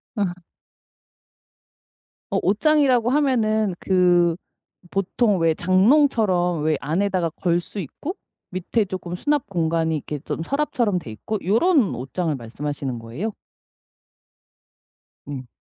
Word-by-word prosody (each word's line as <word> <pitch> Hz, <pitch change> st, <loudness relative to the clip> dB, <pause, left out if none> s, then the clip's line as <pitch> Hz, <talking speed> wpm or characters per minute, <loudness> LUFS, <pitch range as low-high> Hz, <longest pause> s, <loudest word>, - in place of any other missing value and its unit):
어. 205 Hz, -, +1 dB, 2.1 s
어 -, -, +1 dB
옷장이라고 250 Hz, +3 st, +3 dB
하면은 220 Hz, -8 st, +2 dB
그 175 Hz, -2 st, +3 dB, 0.6 s
보통 195 Hz, +2 st, +1 dB
왜 165 Hz, -1 st, +3 dB
장롱처럼 185 Hz, -, +3 dB
왜 155 Hz, -1 st, +2 dB
안에다가 175 Hz, +4 st, 0 dB
걸 175 Hz, +1 st, 0 dB
수 200 Hz, -, -8 dB
있고 280 Hz, -, -5 dB, 0.3 s
밑에 185 Hz, +5 st, 0 dB
쪼끔 185 Hz, -2 st, -5 dB
수납공간이 170 Hz, -, 0 dB
이렇게 150 Hz, 0 st, -4 dB
좀 160 Hz, -, -4 dB
서랍처럼 240 Hz, -, 0 dB
돼 150 Hz, -, -10 dB
있고 110 Hz, -, -4 dB
요런 235 Hz, -, +3 dB
옷장을 150 Hz, +5 st, -2 dB
말씀하시는 135 Hz, +1 st, -5 dB
거예요? 125 Hz, -, -4 dB, 1.9 s
네. 135 Hz, -3 st, -7 dB
185 Hz, 235 characters per minute, -23 LUFS, 160-220 Hz, 2.1 s, 옷장이라고